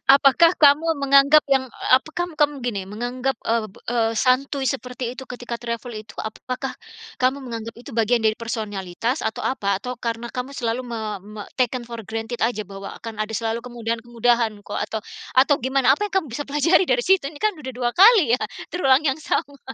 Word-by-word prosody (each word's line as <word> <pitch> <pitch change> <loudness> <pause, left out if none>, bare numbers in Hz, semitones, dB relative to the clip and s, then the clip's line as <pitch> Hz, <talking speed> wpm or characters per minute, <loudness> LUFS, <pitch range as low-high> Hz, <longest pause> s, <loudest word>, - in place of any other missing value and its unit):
Apakah 280 +5 +5
kamu 295 +1 +6 0.2
menganggap 280 +2 +6
yang 265 -1 +3 0.2
apa, 260 +4 +5
kam 350 0 -2
kam 290 -3 +1
gini, 205 -6 -3
menganggap, 245 +6 -2
eee 225 -1 +1 0.2
eee, 230 -2 +1
santuy 265 +3 +1
seperti 250 -2 -5
itu 265 0 -9
ketika 245 -2 -6
travel 235 +1 -5
itu, 215 0 -9
apakah 255 +4 -4 0.5
kamu 260 +2 +1
menganggap 230 -2 -6
itu 245 +4 -11
bagian 230 +1 +2
dari 220 0 +2
personalitas 220 - -3
atau 220 - -3
apa? 200 -6 0
Atau 250 -1 -5
karena 230 0 -4
kamu 250 +1 -5
selalu 235 -1 -2
me 235 -1 -4 0.2
me 210 +1 -9 0.2
taken 250 0 +1
for 235 -1 -6
granted 225 +3 -4
aja 225 -2 +1
bahwa 195 0 -8
akan 225 -2 -8
ada 215 - -6
selalu 225 +1 -1
kemudahan-kemudahan 235 0 0
kok, 205 - -5
atau 215 +1 -3 0.3
atau 265 +3 +5
gimana, 260 +1 +3
apa 415 +8 -2
yang 400 - -9
kamu - - -11
bisa 290 - -3
pelajari 305 +6 +3
dari 245 -4 +2
situ, 385 -4 +3
ini 290 +1 -8
kan 430 -1 +3
udah 260 -3 -6
2 245 -1 0
kali 380 - +7
ya, - - -36 0.3
terulang 275 -5 +4
yang 275 0 +1
sama? 285 -2 -2
245 Hz, 185 wpm, -22 LUFS, 225-275 Hz, 0.5 s, kali